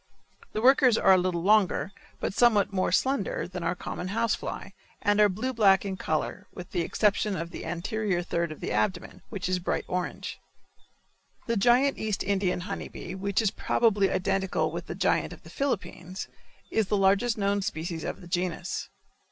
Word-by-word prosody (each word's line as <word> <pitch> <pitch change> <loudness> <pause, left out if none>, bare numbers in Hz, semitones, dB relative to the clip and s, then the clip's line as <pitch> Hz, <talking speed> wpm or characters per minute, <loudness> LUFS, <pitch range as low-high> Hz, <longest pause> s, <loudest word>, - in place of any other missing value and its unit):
The 215 - -2
workers 255 -3 +6
are 190 - +6
a - - +6
little 180 -2 -1
longer, 195 -5 +3 0.3
but - - -2
somewhat 210 -4 +4
more 185 -1 +1
slender 265 -7 0
than 180 0 -6
our 170 +1 0
common 180 - -5
house 230 +4 +1
fly, - - -5 0.3
and 205 +1 +3
are 210 - +6
blue 230 +8 -2
black 200 -4 +4
in 195 -1 -2
color, 155 -4 -2
with 180 - -10
the 175 - 0
exception 205 +3 +1
of 170 +1 -5
the - - -7
anterior 185 +2 -1
third 170 -1 -1
of 155 - -9
the - - -3
abdomen, 175 - -1
which 200 -3 -4
is 185 0 0
bright 175 - -2
orange. 180 0 -4 1.1
The 230 - 0
giant 245 +6 +3
East 215 -3 -1
Indian 190 -2 0
honey - - -5
bee, 175 - -8
which 200 +3 0
is 205 - +2
probably 205 -4 +2
identical 190 0 0
with - - -6
the - - -5
giant - - +1
of - - -14
the - - -13
Philippines, 190 -8 -3 0.4
is 220 -3 +1
the 205 - +1
largest 200 +4 +3
known 200 0 +1
species 165 -2 -4
of - - -5
the 175 - -11
genus. 175 +1 -2
195 Hz, 185 wpm, -28 LUFS, 180-215 Hz, 1.1 s, workers